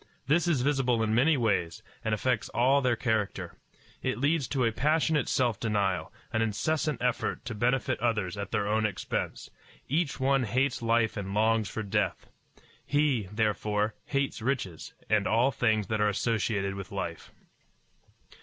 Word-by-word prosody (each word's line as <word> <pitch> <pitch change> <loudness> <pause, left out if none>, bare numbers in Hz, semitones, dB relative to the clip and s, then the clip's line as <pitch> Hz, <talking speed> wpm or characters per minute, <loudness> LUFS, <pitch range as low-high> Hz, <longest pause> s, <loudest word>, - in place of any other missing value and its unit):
This 160 +6 +2
is 155 -7 +2
visible 130 -5 +2
in 110 0 0
many 140 +6 +4
ways, 100 -8 0 0.2
and 110 - -1
affects 115 -1 -1
all 135 +4 +4
their 125 -2 +2
character. 110 -3 -2 0.5
It 130 - -1
leads 145 +1 +1
to 130 -4 0
a 115 - +2
passionate 155 +4 +1
self 120 -5 +1
denial, 100 -5 0 0.2
an 110 - +1
incessant 150 +6 -1
effort 125 +1 -1
to 125 - -4
benefit 125 +4 0
others 105 -6 0
at 100 -1 -5
their 105 -2 0
own 110 +1 +1
expense. 100 - -4 0.4
Each 150 +1 0
one 135 -1 +2
hates 130 +5 0
life 115 -1 +2
and 100 0 -4
longs 110 -1 +2
for 110 - -4
death. 100 -2 -1 0.6
He, 145 -9 +1
therefore, 105 0 0
hates 140 -4 -1
riches, 110 - -3
and 105 -2 +2
all 120 +5 +3
things 110 -5 +1
that 110 +2 -1
are 105 - +4
associated 100 -2 0
with 100 -1 -7
life. - - -5
115 Hz, 155 wpm, -29 LUFS, 105-135 Hz, 0.6 s, many